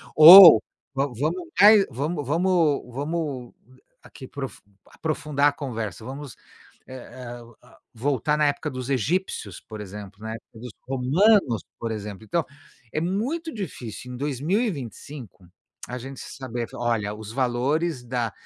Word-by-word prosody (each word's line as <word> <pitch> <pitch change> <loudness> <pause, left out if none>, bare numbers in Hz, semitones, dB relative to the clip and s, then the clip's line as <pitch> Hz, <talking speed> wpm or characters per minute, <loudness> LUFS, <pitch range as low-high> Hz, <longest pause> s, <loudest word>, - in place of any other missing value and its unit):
Ou 170 +2 +11 0.3
va 135 +1 +1
vamos 155 +9 -3 0.2
mai 210 -1 +8
vamos 145 +4 -3
vamos 165 -1 +1
vamos 145 -4 -4 0.5
aqui 130 - -13
profu 135 -2 -7 0.3
aprofundar 150 -2 0
a - - -4
conversa, 115 - -6
vamos, 135 0 -8 0.5
eh 130 - -10
eh, 120 -1 -9 0.3
ah, - - -20 0.2
voltar 145 +4 0
na 150 - +2
época 145 +2 -2
dos 130 -1 -6
egípcios, 135 - -2
por 110 -1 -10
exemplo, 105 +1 -10
na 110 - -6
época 115 - -15
dos 125 -1 -8 0.2
romanos, 135 - +2 0.2
por 115 -1 -3
exemplo, 105 -1 -7
então 160 +8 -1 0.5
é 155 - -1
muito 265 - -2
difícil 125 - -7
em - - -7
2025, 140 - -4 0.4
a 125 - -5
gente 135 +2 -9
saber: 120 -3 -6
"Olha, 115 -4 -1
os 110 0 -9
valores 130 +4 -1
da 120 -2 -2
135 Hz, 135 wpm, -24 LUFS, 120-155 Hz, 0.5 s, Ou